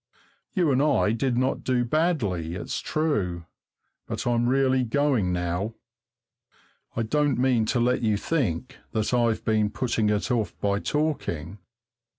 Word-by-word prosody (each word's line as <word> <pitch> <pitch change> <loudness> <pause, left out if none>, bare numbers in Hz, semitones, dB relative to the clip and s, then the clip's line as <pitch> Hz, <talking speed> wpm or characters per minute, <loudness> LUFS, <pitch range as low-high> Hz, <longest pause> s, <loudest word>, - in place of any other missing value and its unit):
You 175 -6 +3
and 130 0 +3
I 145 -8 +3
did 120 +2 0
not 130 +1 0
do 125 -1 +1
badly, 115 - 0
it's - - -4
true 100 - -1 0.6
but - - -4
I'm 120 0 +2
really 130 -1 +3
going 125 -6 +1
now. 90 +5 -2 1.2
I 115 - 0
don't 145 +5 +1
mean 125 -3 +2
to 120 - +1
let 125 +1 +2
you 110 -3 +2
think 105 - -2 0.2
that 110 +2 0
I've 115 -2 +1
been 110 -1 +2
putting 115 -1 0
it 105 +4 0
off 115 -4 -1
by 100 0 +1
talking! 105 - -2
120 Hz, 145 wpm, -26 LUFS, 105-135 Hz, 1.2 s, You